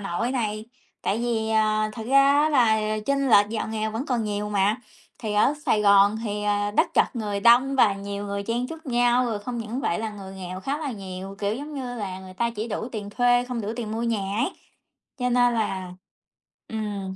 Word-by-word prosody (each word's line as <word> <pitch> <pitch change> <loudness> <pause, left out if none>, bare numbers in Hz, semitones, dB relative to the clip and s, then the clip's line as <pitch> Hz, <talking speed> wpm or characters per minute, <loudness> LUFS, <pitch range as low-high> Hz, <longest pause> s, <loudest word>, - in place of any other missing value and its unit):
Nội 195 +5 -2
này. 215 -4 -2 0.4
Tại 205 - 0
vì, 230 -2 -1
à, 215 -1 +2
thực 225 -1 -7
ra 275 +1 +5
á 310 - +3
là 235 -7 +4 0.3
chênh 275 -1 +1
lệch 205 -2 +6
giàu 220 0 -3
nghèo 220 0 -2
vẫn 230 +7 -4
còn 240 -4 0
nhiều 210 0 -2
mà, 205 +1 +2 0.4
thì 215 -2 -3
ở 215 +7 +4
Sài 210 - +3
Gòn 200 +1 +5
thì, 210 -1 -3
ờ, 205 0 +1
đất 205 - +1
chật - - +2
người 205 -3 -2
đông 245 +5 +5
và 210 -6 +5
nhiều 200 +1 -5
người 200 0 -3
chen 235 +4 -1
chúc 320 +2 -10
nhau, 245 0 +3
rồi 225 -3 -2
không 240 +4 -5
những 230 +3 -4
vậy 170 - 0
là 220 0 -3
người 195 -2 -9
nghèo 185 -1 -6
khá 275 +8 -2
là 285 -5 -3
nhiều, 195 -1 -7
kiểu, 205 0 -1
giống 290 +5 -7
như 255 -3 -4
là, 195 -5 -5
người 185 -1 -11
ta 235 +4 0
chỉ 225 0 -5
đủ 225 - -3
tiền 205 -2 -5
thuê, 245 +2 +3
không 250 -2 -4
đủ 205 - -4
tiền 220 -3 -4
mua 225 - -2
nhà 205 -4 -1
ấy, 235 - +1 0.7
cho 250 -1 0
nên 245 0 +3
là, 190 -5 -2 0.8
ừm. 205 -3 -4
220 Hz, 220 wpm, -25 LUFS, 205-245 Hz, 0.8 s, lệch